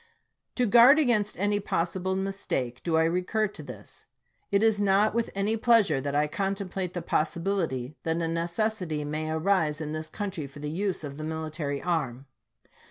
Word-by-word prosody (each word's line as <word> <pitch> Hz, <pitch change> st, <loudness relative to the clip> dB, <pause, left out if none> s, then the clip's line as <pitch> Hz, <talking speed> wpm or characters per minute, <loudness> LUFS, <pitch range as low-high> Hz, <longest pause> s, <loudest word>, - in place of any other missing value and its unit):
To 250 Hz, -, +2 dB
guard 240 Hz, +6 st, +7 dB
against 235 Hz, -8 st, +1 dB
any 205 Hz, +1 st, +1 dB
possible 185 Hz, 0 st, -1 dB
mistake 190 Hz, -11 st, -3 dB
do 165 Hz, -2 st, +1 dB
I 160 Hz, -, +4 dB
recur 180 Hz, +6 st, +1 dB
to -, -, -9 dB
this. -, -, -10 dB, 0.4 s
It 200 Hz, +1 st, +2 dB
is 220 Hz, -2 st, +3 dB
not 205 Hz, +2 st, +3 dB
with 235 Hz, 0 st, 0 dB
any 200 Hz, +3 st, +1 dB
pleasure 215 Hz, -, +4 dB
that 140 Hz, +1 st, -3 dB
I 150 Hz, +1 st, +3 dB
contemplate 195 Hz, +1 st, -3 dB
the 175 Hz, -, -3 dB
possibility 155 Hz, -5 st, -1 dB
that 160 Hz, 0 st, -1 dB
a -, -, -2 dB
neces 170 Hz, +6 st, -1 dB
sity 150 Hz, -2 st, -3 dB
may 155 Hz, +1 st, -3 dB
arise 160 Hz, -2 st, +1 dB
in 155 Hz, -1 st, -4 dB
this 155 Hz, 0 st, -4 dB
country 190 Hz, -6 st, -4 dB
for 140 Hz, -, -14 dB
the 150 Hz, +1 st, -4 dB
use 190 Hz, 0 st, -1 dB
of 140 Hz, -1 st, -6 dB
the 155 Hz, -, -6 dB
military 155 Hz, -2 st, -3 dB
arm. 140 Hz, -7 st, -2 dB
175 Hz, 175 wpm, -27 LUFS, 155-200 Hz, 0.4 s, guard